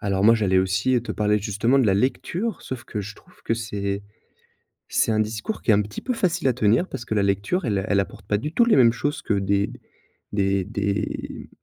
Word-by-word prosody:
Alors 100 Hz, -1 st, 0 dB
moi 115 Hz, +1 st, +7 dB
j'allais 95 Hz, -4 st, +2 dB
aussi, 95 Hz, +7 st, +1 dB
heu, -, -, +2 dB
te 110 Hz, -3 st, -4 dB
parler 105 Hz, 0 st, +1 dB
justement 110 Hz, +6 st, +1 dB
de 125 Hz, -, +3 dB
la 95 Hz, -, +3 dB
lecture, 170 Hz, -, -1 dB
sauf 130 Hz, -2 st, -6 dB
que 105 Hz, -, -4 dB
je 100 Hz, +1 st, -7 dB
trouve -, -, -22 dB
que 115 Hz, -, +1 dB
c'est 100 Hz, -3 st, -3 dB, 0.9 s
c'est -, -, +2 dB
un 110 Hz, -, +1 dB
discours 110 Hz, -, -3 dB
qui 115 Hz, -, +2 dB
est -, -, +7 dB
un 105 Hz, -, +4 dB
petit 105 Hz, +2 st, -7 dB
peu 255 Hz, -, -1 dB
facile 175 Hz, -, 0 dB
à -, -, +2 dB
tenir, 115 Hz, -, +2 dB
parce 120 Hz, -, -7 dB
que 110 Hz, -, -2 dB
la 100 Hz, -, +2 dB
lecture 100 Hz, -, 0 dB
elle 100 Hz, -4 st, +1 dB
a 95 Hz, -, -3 dB
elle 100 Hz, -1 st, +3 dB
apporte 95 Hz, -1 st, -4 dB
pas 105 Hz, -, +2 dB
du 150 Hz, +9 st, -5 dB
tout 235 Hz, -, +4 dB
les 235 Hz, -, +4 dB
mêmes 115 Hz, -2 st, +6 dB
choses 145 Hz, +4 st, -2 dB
que 105 Hz, -, 0 dB
des 100 Hz, +1 st, +1 dB, 0.6 s
des 100 Hz, -1 st, +1 dB
des 100 Hz, 0 st, -3 dB
105 Hz, 235 wpm, -23 LUFS, 100-125 Hz, 0.9 s, moi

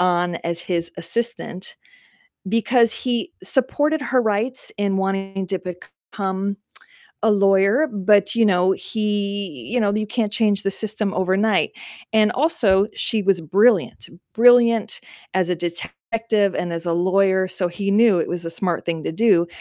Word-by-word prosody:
on 175 Hz, -1 st, +1 dB
as 170 Hz, 0 st, -2 dB
his 170 Hz, -2 st, -3 dB
assistant 190 Hz, +1 st, -4 dB, 0.7 s
because 230 Hz, +1 st, +3 dB
he 250 Hz, +7 st, -3 dB
supported 295 Hz, +3 st, 0 dB
her 255 Hz, -3 st, +1 dB
rights 225 Hz, +4 st, -1 dB
in 200 Hz, -1 st, 0 dB
wanting 195 Hz, 0 st, -2 dB
to 190 Hz, +1 st, -1 dB
become 190 Hz, +2 st, -5 dB, 0.7 s
a 220 Hz, -, +4 dB
lawyer, 200 Hz, +7 st, +3 dB
but, 205 Hz, 0 st, +2 dB
you 230 Hz, -1 st, +3 dB
know, 185 Hz, -2 st, +3 dB
he 200 Hz, -, -3 dB
you 250 Hz, -, +1 dB
know, 205 Hz, -1 st, +1 dB
you 215 Hz, 0 st, -1 dB
can't 220 Hz, -3 st, -1 dB
change 205 Hz, -3 st, +1 dB
the 195 Hz, -, +1 dB
system 215 Hz, -1 st, -2 dB
overnight. 190 Hz, +3 st, +1 dB, 0.4 s
And 215 Hz, 0 st, +3 dB
also, 220 Hz, -9 st, +2 dB
she 220 Hz, -3 st, 0 dB
was 195 Hz, -3 st, +2 dB
brilliant, 200 Hz, +5 st, +2 dB, 0.3 s
brilliant 235 Hz, -1 st, +4 dB, 0.3 s
as 185 Hz, -2 st, +1 dB
a 180 Hz, -, +2 dB
detective 200 Hz, +4 st, -2 dB
and 175 Hz, -1 st, -3 dB
as 170 Hz, +1 st, -4 dB
a 170 Hz, -, 0 dB
lawyer, 190 Hz, +2 st, +2 dB
so 185 Hz, -1 st, -2 dB
he 200 Hz, +3 st, -3 dB
knew 215 Hz, -3 st, +4 dB
it -, -, -1 dB
was 175 Hz, -1 st, -4 dB
a 165 Hz, -, -4 dB
smart 170 Hz, 0 st, -2 dB
thing 165 Hz, -2 st, -3 dB
to -, -, -3 dB
do 185 Hz, -4 st, +3 dB
200 Hz, 155 wpm, -21 LUFS, 180-220 Hz, 0.7 s, a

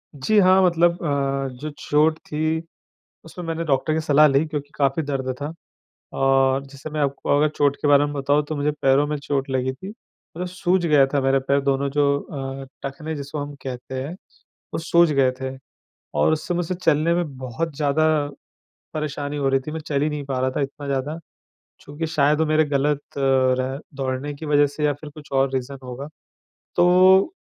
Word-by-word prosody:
जी, 210 Hz, +11 st, +1 dB
हाँ 185 Hz, 0 st, +6 dB
मतलब 170 Hz, -1 st, +4 dB
अ, 140 Hz, -2 st, 0 dB
जो 150 Hz, +4 st, -5 dB
चोट 155 Hz, +2 st, +2 dB
थी, 155 Hz, +1 st, -2 dB, 0.6 s
उसमें 175 Hz, +2 st, -9 dB
मैंने 165 Hz, 0 st, -2 dB
डॉक्टर 145 Hz, +1 st, +1 dB
की 160 Hz, -, +1 dB
सलाह 150 Hz, -1 st, +5 dB
ली 140 Hz, +2 st, +3 dB
क्योंकि 145 Hz, -2 st, -5 dB
काफ़ी 140 Hz, +2 st, +1 dB
दर्द 135 Hz, -3 st, -2 dB
था। 145 Hz, +2 st, -4 dB, 0.7 s
और 135 Hz, 0 st, +3 dB
जैसे 140 Hz, +2 st, -9 dB
मैं 150 Hz, 0 st, -4 dB
आपको 140 Hz, 0 st, 0 dB
अगर 150 Hz, +1 st, +3 dB
चोट 145 Hz, -1 st, +2 dB
के 145 Hz, -, +1 dB
बारे 145 Hz, 0 st, +5 dB
में 145 Hz, -, -4 dB
बताऊँ 145 Hz, +1 st, +1 dB
तो 155 Hz, -, -2 dB
मुझे 145 Hz, +1 st, 0 dB
पैरों 135 Hz, +2 st, +4 dB
में 150 Hz, 0 st, -2 dB
चोट 140 Hz, -1 st, -2 dB
लगी 130 Hz, 0 st, 0 dB
थी, 185 Hz, +9 st, -10 dB
मतलब 180 Hz, -5 st, -10 dB
सूज 180 Hz, 0 st, 0 dB
गया 150 Hz, -4 st, +5 dB
था 140 Hz, -, +2 dB
मेरे 135 Hz, +1 st, +3 dB
पैर 140 Hz, 0 st, +3 dB
दोनों 140 Hz, 0 st, 0 dB
जो 140 Hz, 0 st, +2 dB
अ, 135 Hz, -2 st, -6 dB, 0.2 s
टखने 155 Hz, +3 st, -5 dB
जिसको 145 Hz, +1 st, -5 dB
हम 145 Hz, 0 st, -5 dB
कहते 130 Hz, 0 st, -5 dB
हैं, 150 Hz, +6 st, -5 dB, 0.6 s
वो -, -, -1 dB
सूज 170 Hz, 0 st, +3 dB
गए 135 Hz, -2 st, +3 dB
थे। 130 Hz, 0 st, -4 dB, 0.6 s
और 75 Hz, -, +3 dB
उससे 160 Hz, +3 st, -2 dB
मुझसे 175 Hz, +1 st, -1 dB
चलने 165 Hz, -1 st, +2 dB
में 155 Hz, -7 st, -3 dB
बहुत 130 Hz, +5 st, -4 dB
ज़्यादा, 145 Hz, +1 st, +1 dB, 0.9 s
परेशानी 150 Hz, -1 st, -3 dB
हो 135 Hz, -1 st, +1 dB
रही 135 Hz, 0 st, +3 dB
थी 155 Hz, -, -3 dB
मैं 160 Hz, -, -4 dB
चल 145 Hz, -2 st, -2 dB
ही 155 Hz, -, +1 dB
नहीं 150 Hz, -1 st, -4 dB
पा 135 Hz, -2 st, -2 dB
रहा 130 Hz, +1 st, +1 dB
था 145 Hz, -, -2 dB
इतना 140 Hz, +1 st, -4 dB
ज़्यादा। 140 Hz, +4 st, -2 dB, 0.6 s
चूँकि 150 Hz, +3 st, -5 dB
शायद 150 Hz, -1 st, +2 dB
वो 160 Hz, -, +3 dB
मेरे 155 Hz, +1 st, +3 dB
ग़लत 145 Hz, 0 st, 0 dB, 0.2 s
रह 130 Hz, 0 st, +2 dB, 0.2 s
दौड़ने 135 Hz, +2 st, -3 dB
की 155 Hz, +2 st, -8 dB
वज़ह 145 Hz, -1 st, +4 dB
से 145 Hz, +2 st, -4 dB
या 145 Hz, -, +3 dB
फिर 150 Hz, +1 st, -11 dB
कुछ 150 Hz, 0 st, -14 dB
और 135 Hz, 0 st, +2 dB
रीज़न 130 Hz, +1 st, -3 dB
होगा। 130 Hz, +3 st, -7 dB, 0.7 s
तो, 185 Hz, -, +5 dB
145 Hz, 195 wpm, -23 LUFS, 135-155 Hz, 0.9 s, हाँ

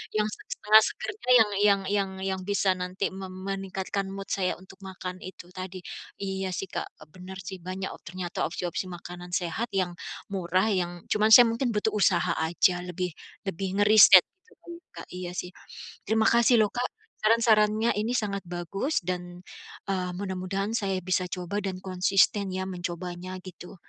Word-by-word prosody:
Yang 210 Hz, 0 st, +2 dB
set -, -, -16 dB
setengah 215 Hz, +1 st, +6 dB
segernya 420 Hz, -12 st, -3 dB
yang 215 Hz, -2 st, +5 dB, 0.2 s
yang 200 Hz, -1 st, +4 dB
yang 200 Hz, -2 st, +1 dB, 0.3 s
yang -, -, -7 dB
bisa 200 Hz, -1 st, +2 dB
nanti 180 Hz, +1 st, -3 dB
mem 190 Hz, 0 st, -7 dB, 0.2 s
meningkatkan 195 Hz, 0 st, -3 dB
mood 195 Hz, 0 st, -7 dB
saya 185 Hz, -2 st, 0 dB
untuk 190 Hz, 0 st, -15 dB
makan 185 Hz, -1 st, -6 dB
itu 185 Hz, -1 st, -10 dB
tadi. 185 Hz, 0 st, -6 dB, 0.4 s
Iya, 190 Hz, -1 st, -2 dB
sih, 190 Hz, +2 st, -3 dB
Kak, -, -, -3 dB
e -, -, -12 dB
bener 185 Hz, +1 st, -9 dB
sih, 190 Hz, +1 st, -7 dB
banyak 185 Hz, +1 st, -4 dB
o -, -, -14 dB
ternyata 175 Hz, 0 st, -4 dB
opsi-opsi 175 Hz, +2 st, -3 dB
makanan 175 Hz, 0 st, -9 dB
sehat 195 Hz, +5 st, -2 dB
yang 180 Hz, -2 st, -1 dB, 0.3 s
murah, 185 Hz, 0 st, 0 dB
yang 180 Hz, -3 st, 0 dB, 0.2 s
cuman 215 Hz, +1 st, +2 dB
saya 240 Hz, +1 st, +10 dB
mungkin 235 Hz, +2 st, 0 dB
butuh 210 Hz, 0 st, 0 dB
usaha 190 Hz, -4 st, +2 dB
aja 175 Hz, +2 st, +2 dB
lebih 180 Hz, 0 st, -3 dB, 0.4 s
lebih 195 Hz, +2 st, -2 dB
ngeriset 205 Hz, -3 st, +9 dB, 0.2 s
sebelum 345 Hz, -6 st, -13 dB
Kak, -, -, -10 dB
iya 180 Hz, -1 st, -5 dB
sih. 180 Hz, 0 st, -4 dB, 0.6 s
Terima 220 Hz, +1 st, +2 dB
kasih 235 Hz, -1 st, +5 dB
loh 210 Hz, -, +3 dB
Kak, 245 Hz, 0 st, -2 dB, 0.4 s
saran-sarannya 220 Hz, 0 st, +4 dB
ini 225 Hz, +4 st, 0 dB
sangat 200 Hz, -4 st, -1 dB
bagus 175 Hz, -, -2 dB
dan, 180 Hz, 0 st, -5 dB, 0.5 s
eee, 185 Hz, -2 st, -1 dB
mudah-mudahan 195 Hz, +1 st, -3 dB
saya 195 Hz, -3 st, -1 dB
bisa 185 Hz, +1 st, 0 dB
coba 180 Hz, +2 st, -4 dB
dan 185 Hz, -1 st, -3 dB
konsisten 190 Hz, +1 st, +2 dB
ya, 190 Hz, 0 st, -2 dB
mencobanya 180 Hz, +1 st, -5 dB
gitu. 180 Hz, 0 st, -11 dB
190 Hz, 165 wpm, -27 LUFS, 180-210 Hz, 0.6 s, saya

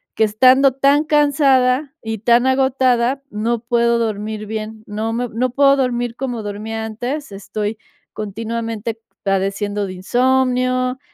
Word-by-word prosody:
que 220 Hz, -, +3 dB
estando 255 Hz, +5 st, +5 dB
tan 280 Hz, +3 st, +3 dB
cansada 285 Hz, -2 st, +2 dB
y 225 Hz, -1 st, -4 dB
tan 240 Hz, +3 st, +3 dB
agotada, 260 Hz, 0 st, +2 dB
no 225 Hz, +2 st, -1 dB
puedo 235 Hz, -1 st, +2 dB
dormir 215 Hz, -1 st, -3 dB
bien, 220 Hz, 0 st, -6 dB
no 215 Hz, +2 st, -3 dB
me 245 Hz, 0 st, -2 dB
no 245 Hz, +3 st, -1 dB
puedo 275 Hz, +1 st, +4 dB
dormir 240 Hz, -2 st, -1 dB
como 245 Hz, -5 st, -4 dB
dormía 220 Hz, +2 st, -5 dB
antes, 245 Hz, +5 st, -5 dB
estoy 210 Hz, +2 st, -4 dB, 0.4 s
continuamente 225 Hz, +1 st, -4 dB, 0.2 s
padeciendo 200 Hz, +1 st, -1 dB
de 185 Hz, -, -6 dB
insomnio. 255 Hz, +4 st, +1 dB
235 Hz, 130 wpm, -19 LUFS, 215-260 Hz, 0.4 s, estando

